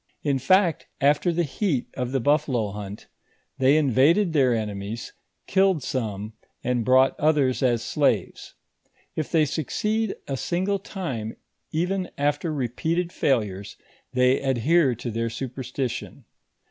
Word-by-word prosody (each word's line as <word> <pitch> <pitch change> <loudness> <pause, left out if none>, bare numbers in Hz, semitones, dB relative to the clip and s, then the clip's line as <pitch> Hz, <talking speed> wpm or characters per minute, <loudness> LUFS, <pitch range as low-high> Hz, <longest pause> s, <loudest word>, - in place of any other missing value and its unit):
In 140 -3 +1
fact, 180 +3 +3
after 145 +5 +3
the 170 +1 +1
heat 150 - -1
of 125 -1 -3
the 135 - +1
buffalo 125 -5 +1
hunt, 105 0 -7 0.5
they 135 +3 +5
invaded 155 - +3
their 135 -5 +4
enemies, 105 -1 -3 0.3
killed 190 -6 +2
some, 110 -5 -3 0.3
and 125 -1 0
brought 130 +2 +4
othera 145 -4 +2
as 120 -3 +2
slaves. - - -1 0.6
If 155 - -3
they 160 -3 +4
succeed 210 - -1
a 135 - -2
single 190 +7 -1
time, 135 - -5 0.3
even 180 +3 -1
after 145 +3 0
repeated 160 +6 -1
failures, 100 -7 -1 0.3
they 125 +1 +3
adhere 135 +2 +2
to 120 +1 -5
their 115 +1 -1
superstition. 125 0 -5
135 Hz, 125 wpm, -25 LUFS, 120-165 Hz, 0.6 s, they